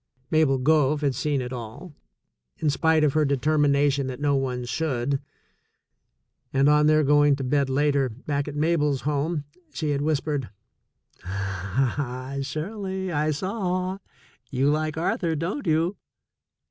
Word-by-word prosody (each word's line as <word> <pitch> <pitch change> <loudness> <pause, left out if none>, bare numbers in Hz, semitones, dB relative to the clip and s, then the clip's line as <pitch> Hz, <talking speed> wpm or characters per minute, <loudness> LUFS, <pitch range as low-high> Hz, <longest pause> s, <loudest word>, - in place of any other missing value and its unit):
Mabel 155 -4 +3
Gove 150 +1 +3
had 140 -2 +1
seen 145 0 -1
it 125 +1 -6
all, 125 +8 -8 0.6
in 150 - +1
spite 160 +2 +2
of 145 -3 +3
her 155 - +3
deter 150 +2 +1
mination 140 -1 +2
that 130 0 -5
no 145 -1 +2
one 125 -2 -2
should, 135 +1 -1 1.3
and 135 +1 +3
on 150 0 +5
their 155 0 +4
going 145 0 +4
to 135 - -5
bed 140 +1 +1
later, 140 -1 +2
back 140 +5 -3
at 145 - -5
Mabel's 150 -3 +1
home, 150 +2 -1 0.3
she 155 -2 -2
had 140 -1 0
whispered: 145 - -1 0.7
"Ah, 120 - -2
Shirley, 190 +5 -4
I 155 -1 +1
saw. 185 +2 -2 0.5
You 135 +2 +2
Hke 155 0 -1
Arthur, 165 0 0
don't 180 - -3
you?" 165 +5 +1
145 Hz, 140 wpm, -25 LUFS, 135-155 Hz, 1.3 s, on